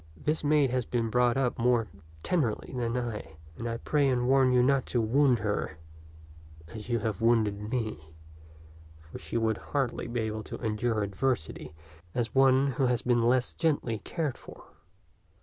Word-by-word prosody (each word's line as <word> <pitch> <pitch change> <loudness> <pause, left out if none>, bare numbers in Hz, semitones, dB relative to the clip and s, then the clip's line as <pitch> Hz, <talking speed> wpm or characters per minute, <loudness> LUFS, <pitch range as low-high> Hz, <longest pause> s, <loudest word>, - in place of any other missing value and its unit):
This 150 - -1
maid 145 -3 +3
has 125 -2 -1
been 115 -2 -1
brought 125 +1 +3
up 130 -2 0
more 120 -2 +2 0.4
tenderly 140 -12 -1
than 120 -1 -1
I, 105 -10 -5 0.2
and 115 +5 -4
I 115 - -3
pray 145 +3 +1
and 125 -1 +1
warn 135 -1 +4
you 125 -1 +4
not 135 0 +2
to 120 - 0
wound 125 +3 +3
her 100 -7 -2 0.9
as 110 0 -9
you 120 - +2
have 110 -3 -3
wounded 110 -3 +2
me, 105 -11 -4 0.8
for 80 0 -11
she - - -4
would 110 -1 +1
hardly 135 -5 -2
be 120 0 -2
able 110 0 -3
to - - -7
endure 110 -1 -1
adversity 100 - -2 0.4
as 120 -2 -1
one 135 0 +5
who 130 +1 +1
has 125 -2 0
been 120 -1 +2
less 125 +2 +2
gently 145 -9 0
cared 155 -3 -3
for.' - - -13
120 Hz, 165 wpm, -29 LUFS, 110-130 Hz, 0.9 s, one